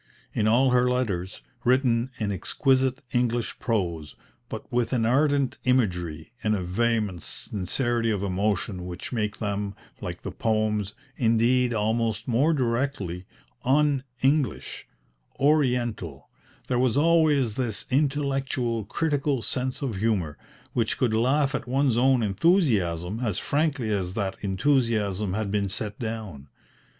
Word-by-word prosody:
In 105 - +1
all 125 +4 +4
her 125 0 +4
letters, 95 - -2 0.2
written 125 -1 +2
in 105 -4 -1
exquisite 130 - +1
English 120 -1 0
prose, 85 -10 -2 0.3
but - - -6
with 120 +1 +1
an 115 -3 +2
ardent 140 +2 +2
imagery 90 -10 0
and 110 0 +2
a 95 - -2
vehement 105 -1 0
sincerity 115 - -1
of 100 -3 -1
emotion 95 -1 -1
which 90 +1 -6
make 105 -3 -1
them, 100 -2 -3 0.3
like - - -6
the - - -4
poems, 110 -2 0 0.2
indeed 120 +2 +3
almost 110 0 0
more 130 +7 +3
directly, 115 - -1 0.4
un 140 0 +3 0.2
English, 140 0 0 0.5
Oriental, 125 - +1 0.4
there 125 - +1
was 130 0 +2
always 150 -6 +3
this 115 -3 -2
intellectual, 135 -5 0
critical 145 -1 0
sense 130 +2 -2
of 120 -8 -2
humour, 95 -8 0 0.4
which 115 -2 0
could 120 -4 +1
laugh 130 +5 +2
at - - -3
one's 135 -1 +2
own 125 0 +3
enthusiasm 100 - +2
as 110 -7 -1
frankly 140 -6 0
as 95 -2 -1
that 100 -3 -1
enthusiasm 105 -3 +1
had 105 -2 -2
been 100 -1 0
set 105 +2 -5
down. 110 - -5
115 Hz, 130 wpm, -26 LUFS, 100-130 Hz, 0.5 s, all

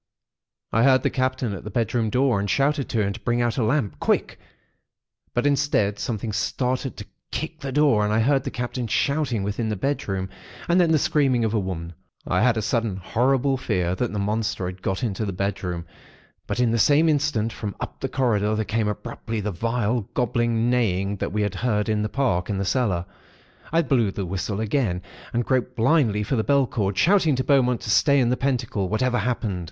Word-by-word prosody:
I 115 - +2
heard 130 +1 +5
the - - +1
Captain 130 -3 -1
at 95 - -7
the 105 - -6
bedroom 115 +1 0
door, 125 -2 +2
and 100 0 -2
shouted 140 +4 +1
to 110 -2 +1
him 100 - -1
to 115 - -9
bring 120 +1 0
out 120 0 0
a - - +2
lamp, 110 - 0
quick; - - 0 1.0
but 120 - +1
instead, 140 -8 +1
something 110 -1 -3
started 130 +5 -1
to 105 - -7 0.2
kick 160 0 -4
the 135 -1 -5
door, 140 -6 +3
and 105 - 0
I 110 - +2
heard 135 +3 +2
the 135 - -3
Captain 125 -1 -4
shouting 135 -2 0
within 105 +3 -2
the 105 - -1
bedroom, 95 -5 -2 0.4
and 175 +1 +4
then 170 -2 +3
the 160 - +5
screaming 135 -5 +2
of 110 - 0
the 110 - +1
women. 90 -3 -4 0.3
I - - +1
had 120 0 +3
a 110 - -1
sudden 115 -3 0
horrible 130 +7 +1
fear 90 -8 -1
that 120 +5 -2
the 105 - -4
monster 105 0 -1
had 90 0 -6
got 95 +2 -2
into 110 -2 -1
the 100 - -2
bedroom; 90 -3 -3 0.6
but - - -2
in 120 -2 +3
the 115 - +1
same 150 +7 +4
instant, 145 -8 +1
from 105 -2 -5
up - - -6
the 135 - -3
corridor, 110 -5 +1
there 110 0 -1
came 110 0 0
abruptly 115 +1 -4
the 105 0 -2
vile, 115 +2 -1
gobbling 120 -1 +1
neighing 100 -5 +1
that - - -3
we 105 +2 0
had 105 -2 -1
heard 105 0 0
in 110 -1 +1
the 105 - -1
park 115 -11 0
and 100 -2 -1
the 100 - -1
cellar. 95 -7 0 0.7
I 165 +1 +3
blew 125 -7 +2
the 95 0 -4
whistle 95 +3 -3
again, 110 -5 0 0.3
and 120 0 0
groped 125 -1 0
blindly 115 -4 +2
for 125 +6 -1
the 110 - +1
bell 140 +1 +3
cord, 100 -5 -2
shouting 170 -5 +4
to 130 - -1
Beaumont 125 -4 +2
to 110 - -3
stay 140 +5 +4
in 120 -2 +2
the - - +3
pentacle, 120 -8 -1
whatever 120 +4 +1
happened. 115 -6 -1
115 Hz, 210 wpm, -24 LUFS, 105-130 Hz, 1.0 s, heard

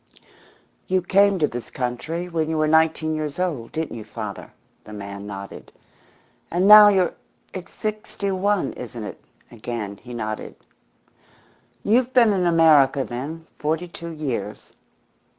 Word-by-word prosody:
"You 185 -1 +1
came 200 +2 +4
to 155 -4 +2
this 120 -3 -7
country 145 +8 -3
when 160 -2 -1
you 160 - -1
were 155 0 +2
nineteen 160 0 +2
years 155 -2 -3
old 155 -11 -2
didn't 160 -4 -3
you, 110 - -7
father?" 105 0 -7 0.3
The 105 - -11
man 100 0 -7
nodded. 100 -1 -9 0.8
"And 180 +3 +1
now 210 0 +11
you're 190 -4 +3 0.4
it's 185 -1 -8
sixty 210 -2 -4
one, 190 -4 0
isn't 120 -2 -7
it?" 105 - -8 0.3
Again 110 -3 -5
he 125 +3 -10
nodded. 110 -2 -5 1.3
"You've 245 +4 +2
been 230 -4 +6
in 180 -2 +1
America, 155 -5 +5
then, 145 +8 -6
forty 160 +4 -1
two 170 0 -8
years. 125 -10 -5
160 Hz, 140 wpm, -23 LUFS, 120-185 Hz, 1.3 s, now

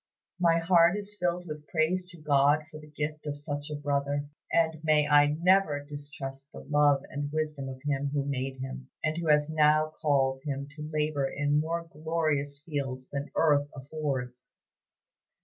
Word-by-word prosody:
My 170 -2 +4
heart 170 +2 +4
is 205 0 -5
filled 180 0 0
with 150 -1 -7
praise 180 +3 0
to 175 - -11
God 145 0 +3
for 155 - -9
the 150 0 -13
gift 150 0 -4
of 145 0 -3
such 145 0 -5
a 150 - -3
brother, 145 0 -1 0.2
and 160 -1 +1
may 155 -2 +3
I 145 0 +6
never 180 -4 +4
distrust 140 -2 -6
the - - -9
love 145 -2 +4
and 145 +1 -4
wisdom 150 -3 -2
of 130 0 -8
Him 140 -1 0
who 140 -1 -1
made 135 -1 -2
him, 130 0 -7
and 155 0 +1
who 170 0 -3
has 150 0 +3
now 155 0 +3
called 135 -3 +2
him 140 -2 -3
to 150 +1 -7
labor 150 -2 0
in 145 +1 +1
more 165 +2 -2
glorious 155 -3 -1
fields 135 -4 -4
than 140 +1 -4
earth 145 -3 +3
affords! 135 -3 -5
150 Hz, 170 wpm, -29 LUFS, 140-155 Hz, 0.2 s, I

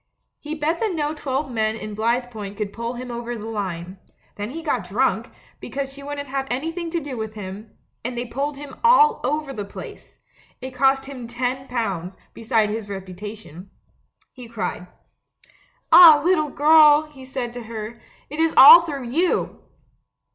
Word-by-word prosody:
He 305 +1 -6
bet 320 +2 -1
that 430 -6 -1
no 300 -1 -1
twelve 275 -2 -3
men 220 -2 0
in 215 -1 -7
Blithepoint 220 -2 -2
could 205 -2 -4
pull 235 +1 -5
him 250 0 -7
over 240 0 -5
the 215 - -8
line. 190 -4 -5 0.4
Then 205 +1 -5
he 325 +5 -7
got 245 - -2
drunk, 245 +7 0 0.3
because 275 -1 -5
she 280 - -12
wouldn't 285 0 -6
have 270 0 -3
anything 330 +7 -3
to 340 +1 -2
do 285 -4 -7
with 220 -1 -6
him 205 +1 -9
— - - -48
and 245 +1 -4
they 240 - -2
pulled 275 +4 -4
him 280 -2 -10
all 460 -1 +5
over 300 -2 -2
the 210 - -5
place. 200 - -11 0.4
It 260 +1 -8
cost 270 +1 +2
him 260 -4 -8
ten 250 +2 -3
pounds, 195 -7 -3 0.2
besides 225 -2 0
his 215 -1 -5
reputation. 195 -1 -9 0.6
He 250 -2 -11
cried. 225 -5 -5 1.0
"Ah, 325 -2 +10
little 325 -5 +2
girl," 300 +1 +6
he 295 -4 -14
said 255 -2 -5
to 245 -2 -8
her, 225 +1 -7 0.3
"it 300 - -8
is 325 0 +2
all 305 +6 +11
through 290 -6 -5
you!" 335 +9 -1
250 Hz, 170 wpm, -22 LUFS, 220-295 Hz, 1.0 s, all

